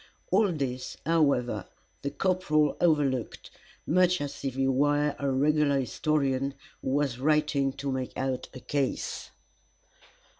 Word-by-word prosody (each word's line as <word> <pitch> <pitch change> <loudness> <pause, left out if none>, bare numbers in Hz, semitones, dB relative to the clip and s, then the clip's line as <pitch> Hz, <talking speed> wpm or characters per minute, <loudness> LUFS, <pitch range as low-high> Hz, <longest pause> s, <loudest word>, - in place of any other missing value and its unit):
All 200 +1 +4
this, 130 -5 -4
however, 140 - +1 0.3
the 140 - -2
corporal 155 -5 +1
overlooked, 145 -8 +1 0.3
much 180 +1 +3
as 145 -1 -5
if 135 -2 -2
he 135 0 +1
were 145 +2 +2
a 140 - 0
regular 145 +1 +2
historian 135 0 0 0.3
who - - -3
was 135 -2 0
writing 150 -1 +2
to 140 0 -4
make 130 -1 -4
out 130 -1 -2
a 130 - -10
case. 140 -2 -2
140 Hz, 125 wpm, -28 LUFS, 130-150 Hz, 0.3 s, All